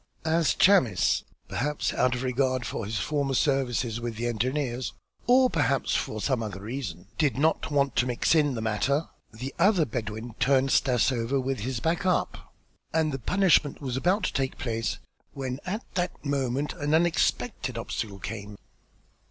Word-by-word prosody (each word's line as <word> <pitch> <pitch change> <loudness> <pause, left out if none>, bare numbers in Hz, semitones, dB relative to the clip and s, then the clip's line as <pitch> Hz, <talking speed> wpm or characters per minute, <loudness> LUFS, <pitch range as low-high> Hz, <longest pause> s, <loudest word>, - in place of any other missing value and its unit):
As 160 0 +2
Chamis, 175 - +4 0.2
perhaps 150 +2 -1
out 125 0 +2
of 125 - -4
regard 130 0 0
for 110 - -4
his 110 +1 -2
former 140 +3 -1
service 135 -2 +1 0.2
with 120 -1 -4
the 115 +2 -3
engineers 125 +2 -1 0.3
or 255 +1 +6
perhaps 145 - +1
from 110 - -1
some 130 +1 0
other 100 -3 -5
reason, 105 -6 -5
did 145 -5 +2
not 160 +3 +1
want 140 -2 +1
to 125 - +3
mix 120 +4 +1
in 145 -5 +3
the 110 - -3
matter, 135 +8 0 0.2
the 125 +5 -6
other 185 -2 +4
Bedouin 115 -1 -5
turned 135 +1 +3
Stas 125 0 +3
over 125 +2 0
with 135 0 -2
his 120 +2 -3
back 165 +8 0
up 185 -2 -1 0.4
and 160 -1 +1
the 135 - -3
punishment 170 - +3
was 130 -4 -3
about 180 +10 +1
to - - -1
take 135 -1 -1
place, 115 -5 -2 0.4
when 130 -1 -4
at 210 +5 -2
that 180 -3 -3
moment 140 0 -1
an 145 +1 0
unexpected 170 +1 +1
obstacle 100 -3 -4
came. 100 0 -7
130 Hz, 165 wpm, -27 LUFS, 120-150 Hz, 0.4 s, or